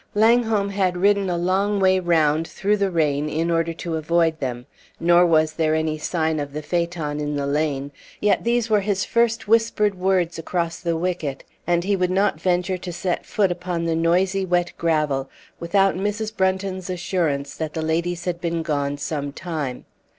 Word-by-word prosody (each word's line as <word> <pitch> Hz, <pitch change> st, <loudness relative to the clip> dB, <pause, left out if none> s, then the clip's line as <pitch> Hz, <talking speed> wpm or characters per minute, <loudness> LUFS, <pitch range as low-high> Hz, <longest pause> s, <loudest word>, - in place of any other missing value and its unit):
Langholm 220 Hz, -2 st, +3 dB
had 190 Hz, -3 st, 0 dB
ridden 200 Hz, +1 st, +2 dB
a 175 Hz, -, 0 dB
long 195 Hz, +4 st, +1 dB
way 190 Hz, -1 st, +4 dB
round, 165 Hz, -3 st, +2 dB
through 205 Hz, +2 st, 0 dB
the 200 Hz, -1 st, +1 dB
rain, 150 Hz, -4 st, 0 dB
in 165 Hz, +3 st, -1 dB
order 165 Hz, 0 st, +1 dB
to 165 Hz, 0 st, -4 dB
avoid 160 Hz, 0 st, +1 dB
them; 125 Hz, -3 st, -4 dB, 0.3 s
nor 175 Hz, +1 st, +5 dB
was 155 Hz, -1 st, +3 dB
there 155 Hz, -1 st, +1 dB
any 160 Hz, -1 st, -1 dB
sign 160 Hz, -1 st, -1 dB
of 145 Hz, -1 st, -5 dB
the 150 Hz, +1 st, -5 dB
phaeton 170 Hz, -2 st, -2 dB
in 150 Hz, 0 st, -2 dB
the 140 Hz, -1 st, -1 dB
lane; 140 Hz, -1 st, -1 dB, 0.3 s
yet 210 Hz, -, +2 dB
these 235 Hz, -1 st, +1 dB
were 215 Hz, -2 st, +3 dB
his 200 Hz, -1 st, -1 dB
first 235 Hz, -1 st, +1 dB
whispered 220 Hz, -2 st, +3 dB
words 180 Hz, -3 st, 0 dB
across 170 Hz, 0 st, -2 dB
the 170 Hz, -2 st, -1 dB
wicket, 165 Hz, -5 st, -3 dB, 0.2 s
and 175 Hz, 0 st, +2 dB
he 200 Hz, +2 st, +1 dB
would 180 Hz, -1 st, 0 dB
not 195 Hz, +2 st, +1 dB
venture 180 Hz, 0 st, 0 dB
to 180 Hz, 0 st, -6 dB
set 175 Hz, +1 st, -3 dB
foot 200 Hz, -5 st, +1 dB
upon 175 Hz, -1 st, -3 dB
the 165 Hz, -1 st, 0 dB
noisy 185 Hz, +4 st, +2 dB
wet 175 Hz, -1 st, +1 dB
gravel 150 Hz, -5 st, 0 dB, 0.3 s
without 195 Hz, +3 st, +2 dB
Mrs. 210 Hz, +3 st, -3 dB
Brunton's 190 Hz, -1 st, -1 dB
assurance 165 Hz, -6 st, -1 dB
that 155 Hz, -2 st, -4 dB
the 160 Hz, -, -2 dB
ladies 170 Hz, +2 st, -1 dB
had 175 Hz, -1 st, -2 dB
been 170 Hz, -1 st, -1 dB
gone 145 Hz, -2 st, -1 dB
some 145 Hz, -1 st, -3 dB
time. 150 Hz, -5 st, -5 dB
175 Hz, 180 wpm, -22 LUFS, 155-190 Hz, 0.3 s, nor